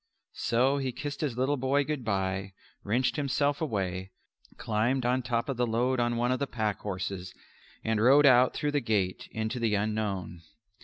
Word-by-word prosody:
So 130 Hz, +5 st, +1 dB
he 130 Hz, -2 st, -2 dB
kissed 145 Hz, +3 st, -5 dB
his 135 Hz, -6 st, -2 dB
little 135 Hz, +3 st, +1 dB
boy 135 Hz, +2 st, +2 dB
"good 150 Hz, -2 st, -3 dB
bye," 95 Hz, -2 st, -2 dB, 0.3 s
wrenched 125 Hz, +7 st, 0 dB
himself 140 Hz, +1 st, 0 dB
away, 95 Hz, -, -2 dB, 0.5 s
climbed 120 Hz, +4 st, 0 dB
on 125 Hz, +1 st, +2 dB
top 115 Hz, 0 st, -1 dB
of 135 Hz, -3 st, -3 dB
the 125 Hz, 0 st, +1 dB
load 125 Hz, +3 st, +1 dB
on 120 Hz, 0 st, +1 dB
one 120 Hz, +1 st, +1 dB
of 130 Hz, -, 0 dB
the 140 Hz, -, -1 dB
pack 110 Hz, -5 st, -2 dB
horses 95 Hz, -2 st, -5 dB, 0.5 s
and 110 Hz, -1 st, 0 dB
rode 140 Hz, +5 st, +6 dB
out 130 Hz, -1 st, +6 dB
through 150 Hz, -1 st, -1 dB
the 145 Hz, -1 st, +1 dB
gate 100 Hz, -6 st, -1 dB
into 110 Hz, +3 st, -3 dB
the 115 Hz, -3 st, +1 dB
unknown. 100 Hz, -4 st, -2 dB
120 Hz, 175 wpm, -29 LUFS, 105-130 Hz, 0.5 s, rode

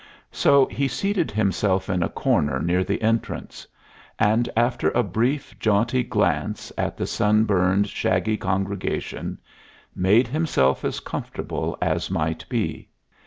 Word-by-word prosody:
So 140 Hz, -1 st, +4 dB
he 135 Hz, +5 st, -1 dB
seated 175 Hz, +7 st, -1 dB
himself 100 Hz, -2 st, 0 dB
in 90 Hz, -2 st, 0 dB
a 85 Hz, -, 0 dB
corner 75 Hz, -, +1 dB
near 90 Hz, +2 st, +1 dB
the -, -, -2 dB
entrance, 115 Hz, +1 st, -2 dB, 0.5 s
and 110 Hz, +2 st, +2 dB
after 120 Hz, +1 st, +2 dB
a 120 Hz, -, +1 dB
brief, 120 Hz, -, -1 dB
jaunty 115 Hz, +4 st, +2 dB
glance 110 Hz, -4 st, -1 dB
at -, -, -2 dB
the -, -, -2 dB
sunburned, 100 Hz, -2 st, +2 dB
shaggy 95 Hz, +2 st, 0 dB
congregation, 95 Hz, +1 st, -3 dB, 0.6 s
made 105 Hz, +7 st, +4 dB
himself 125 Hz, -, +1 dB
as -, -, -2 dB
comfortable -, -, -4 dB
as -, -, 0 dB
might 80 Hz, +1 st, -2 dB
be. -, -, -2 dB
105 Hz, 125 wpm, -23 LUFS, 95-120 Hz, 0.6 s, So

